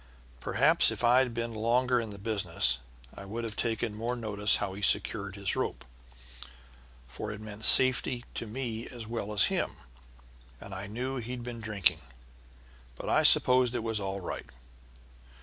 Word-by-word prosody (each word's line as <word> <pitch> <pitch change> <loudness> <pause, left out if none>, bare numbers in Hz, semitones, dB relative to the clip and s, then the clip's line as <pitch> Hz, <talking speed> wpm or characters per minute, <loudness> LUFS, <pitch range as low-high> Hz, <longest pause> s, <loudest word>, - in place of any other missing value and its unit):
Perhaps - - +3
if - - -5
I'd 125 +1 +3
been 115 0 -5
longer 120 +3 +1
in 115 -2 -5
the 100 - -9
business 100 - 0 0.3
I - - -10
would 110 +4 -6
have 110 -2 -5
taken 115 -1 -2
more 115 +3 -4
notice 105 -3 +1
how 95 - -3
he 100 - -9
secured 100 0 +1
his 100 -2 -3
rope, - - -4 1.2
for 105 +12 -7
it 105 - -8
meant 110 0 -5
safety 130 -1 +5
to 115 - -5
me 115 0 -5
as 120 -3 -9
well 110 -2 -5
as 105 -2 +4
him, - - -2 0.9
and 100 - -10
I 95 +1 -6
knew 125 +6 -5
he'd 125 0 -6
been 120 -1 -8
drinking, 100 -6 +1 1.0
but - - -7
I - - +3
supposed 125 -1 +6
it 115 - -3
was 115 -2 -2
all 95 0 -5
right. 90 - -7
110 Hz, 165 wpm, -28 LUFS, 100-120 Hz, 1.2 s, supposed